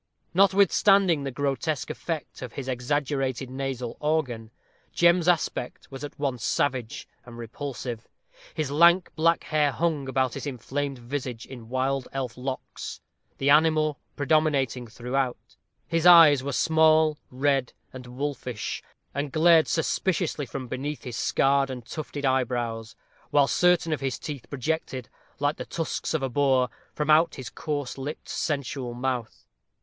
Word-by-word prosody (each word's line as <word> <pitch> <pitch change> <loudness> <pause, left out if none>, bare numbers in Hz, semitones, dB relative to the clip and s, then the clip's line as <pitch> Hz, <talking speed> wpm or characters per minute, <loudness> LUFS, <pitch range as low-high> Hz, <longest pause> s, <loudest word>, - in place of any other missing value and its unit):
Notwithstanding 195 -3 +4
the - - -1
grotesque 140 +2 -2
effect 165 -4 -5
of 125 -3 -7
his 135 -2 -6
exaggerated 130 0 -1
nasal 130 -3 -4
organ, 140 -8 -1 0.4
Jem's 170 0 +4
aspect 160 -8 -1
was 135 +1 -8
at 145 - -7
once 135 -5 -2
savage 130 -5 -1 0.2
and 120 -1 -12
repulsive; 120 0 -6 0.5
his 155 -3 -2
lank 170 +4 +5
black 165 +1 +2
hair 150 -2 +1
hung 155 -3 -1
about 130 -2 +1
his - - -5
inflamed 140 +2 -3
visage 125 -1 -5
in 120 -4 -11
wild 130 +1 -1
elf 130 -3 -3
locks, 130 +1 -6 0.4
the 140 +1 +2
animal 155 -1 +4 0.2
predominating 140 -4 +1
throughout; 125 +3 -2 0.5
his 165 +1 +2
eyes 165 -6 +9
were 140 - -2
small, 160 +1 +4
red, 135 -1 +1 0.2
and 130 -1 -9
wolfish, 125 -3 -4 0.3
and 140 0 -3
glared 165 +1 +5
suspiciously 160 -3 0
from 130 0 -6
beneath 130 +1 -4
his 125 -2 -6
scarred 135 +2 +2
and 125 -3 -6
tufted 145 0 -5
eyebrows; 120 -4 -1 0.3
while 145 -1 +4
certain 175 +1 +3
of 145 - -3
his 135 -1 -2
teeth 145 -5 -7
projected, 135 -3 -3 0.3
like 145 +2 0
the - - -5
tusks 165 -1 -3
of 150 - -1
a 135 - 0
boar, 130 -1 +2 0.2
from 150 0 0
out 160 +2 +5
his 130 - -7
coarse 145 -4 -4
lipped, 145 +3 -6
sensual 135 -4 -3
mouth. 125 -2 -3
140 Hz, 140 wpm, -26 LUFS, 125-155 Hz, 0.5 s, eyes